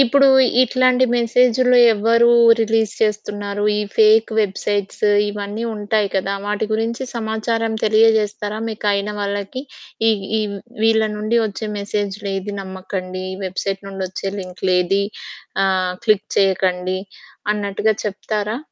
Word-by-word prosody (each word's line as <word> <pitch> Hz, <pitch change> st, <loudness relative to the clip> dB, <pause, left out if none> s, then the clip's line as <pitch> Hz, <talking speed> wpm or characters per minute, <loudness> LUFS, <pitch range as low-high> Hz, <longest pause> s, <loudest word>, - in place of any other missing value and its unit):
ఇప్పుడు 275 Hz, +1 st, +5 dB, 0.4 s
ఇట్లాంటి 255 Hz, 0 st, +3 dB
మెసేజుల్లో 250 Hz, +1 st, +3 dB, 0.2 s
ఎవరు 230 Hz, +3 st, +3 dB, 0.3 s
రిలీజ్ 225 Hz, -1 st, +1 dB
చేస్తున్నారు? 205 Hz, -1 st, -2 dB
ఈ -, -, 0 dB, 0.2 s
ఫేకు 220 Hz, +1 st, +4 dB
వెబ్‌సైట్సు 205 Hz, 0 st, -1 dB, 0.2 s
ఇవన్నీ 205 Hz, +2 st, -5 dB
ఉంటాయి 210 Hz, 0 st, 0 dB
కదా! 195 Hz, +1 st, -1 dB
వాటి 210 Hz, +1 st, -1 dB
గురించి 225 Hz, +3 st, -1 dB
సమాచారం 225 Hz, 0 st, -2 dB
తెలియజేస్తారా? 215 Hz, -1 st, +2 dB
మీకయిన 205 Hz, -1 st, -1 dB
వాళ్ళకి 200 Hz, +5 st, -4 dB, 0.5 s
ఈ, -, -, +6 dB, 0.3 s
ఈ -, -, 0 dB, 0.4 s
వీళ్ళ 220 Hz, 0 st, +4 dB
నుండి 215 Hz, +3 st, 0 dB
ఒచ్చే 215 Hz, +1 st, -6 dB
మెసేజులేది 200 Hz, -1 st, -3 dB
నమ్మకండి. 185 Hz, -1 st, -6 dB
ఈ -, -, -5 dB
వెబ్‌సైట్ 195 Hz, +1 st, -3 dB
నుండి 195 Hz, -1 st, -6 dB
వచ్చే 190 Hz, +1 st, -5 dB
లింకులేది 185 Hz, +1 st, 0 dB, 0.6 s
ఆహ్, 185 Hz, -1 st, +1 dB
క్లిక్ 210 Hz, -1 st, +2 dB
చేయకండి, 185 Hz, -1 st, +1 dB, 0.5 s
అన్నట్టుగా 205 Hz, +1 st, 0 dB
చెప్తారా? 210 Hz, +2 st, -3 dB
210 Hz, 110 wpm, -19 LUFS, 195-220 Hz, 0.6 s, ఈ